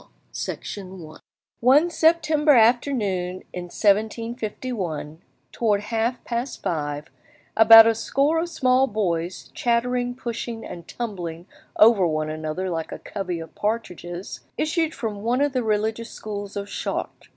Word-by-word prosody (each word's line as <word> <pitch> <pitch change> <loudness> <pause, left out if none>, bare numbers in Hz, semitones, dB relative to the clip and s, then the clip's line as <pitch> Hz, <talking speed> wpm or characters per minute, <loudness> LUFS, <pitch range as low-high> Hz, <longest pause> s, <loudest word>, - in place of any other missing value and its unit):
] - - -40
*DERUES* 185 -5 -6 0.4
One 285 +8 +5
September 315 -2 +3
afternoon 220 -7 +2
in 180 -1 -5
1751, 210 - -1 0.3
towards 210 -3 +1
half 230 +3 -1
past 240 +2 -4
five, 145 -2 -3 0.4
about 225 0 +10
a 230 - +4
score 275 +8 +1
of 340 +1 -2
small 260 -4 +3
boys, 180 -5 -2
chattering, 245 +1 0
pushing, 235 -2 -5
and 170 -1 -9
tumbling 175 -8 -5 0.3
over 215 -5 +6
one 155 -1 -1
another 155 +4 -3
like 165 -1 -3
a - - -5
covey 185 -4 -5
of 165 -1 -9
partridges, 185 -4 -4 0.2
issued 320 0 0
from 210 -4 -4
one 240 +4 +1
of 285 -1 +1
the 255 - +1
religious 220 +1 -1
schools 205 -1 -7
of 200 0 -4
Chartres. - - -4
220 Hz, 130 wpm, -24 LUFS, 180-245 Hz, 0.4 s, about